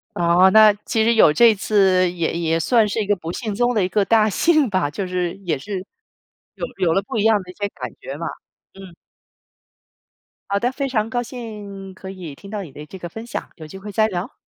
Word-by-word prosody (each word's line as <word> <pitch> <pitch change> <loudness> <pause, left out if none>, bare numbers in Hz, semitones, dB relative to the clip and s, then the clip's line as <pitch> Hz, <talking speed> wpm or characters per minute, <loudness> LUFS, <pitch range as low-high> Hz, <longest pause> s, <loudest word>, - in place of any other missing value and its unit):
哦， 175 +2 +4
那 215 -1 +7
其 220 -1 +1
实 230 +1 +3
有 215 -9 +6
这 230 +6 +6
次 190 -3 +2
也 170 -3 -2
也 165 -1 0
算 225 +4 +3
是 215 - -2
一 - - -2
个 205 - +3
不 170 -2 -6
幸 215 +1 -4
中 245 +3 +1
的 210 - +2
一 - - +1
个 205 0 +2
大 215 0 +3
幸 310 - +3
吧， 185 -7 0
就 195 +5 -4
是 180 -1 -2
也 155 -5 0
是 190 +4 -5 0.7
有 - - -4
有 170 -3 +2
了 195 - +2
不 220 - -5
一 205 - +1
样 220 -1 +5
的 180 - -11
一 - - -17
些 205 +1 -3
感 - - -7
觉 - - -6
嘛， - - -5 0.5
嗯。 190 -3 -12 1.5
好 200 - +1
的， 245 +3 0
非 275 0 -3
常 225 -3 -1
高 245 -1 -1
兴 210 -6 -8
可 190 0 -10
以 180 -6 -8
听 200 +7 -13
到 210 -1 -4
你 155 - -11
的 150 +2 -10
这 190 - -10
个 175 -1 -7
分 225 +6 -9
享， - - -5
有 155 -1 -10
机 190 - -10
会 205 +2 -8
再 215 +2 +2
聊。 180 -2 -5
200 Hz, 250 characters per minute, -21 LUFS, 180-220 Hz, 1.5 s, 那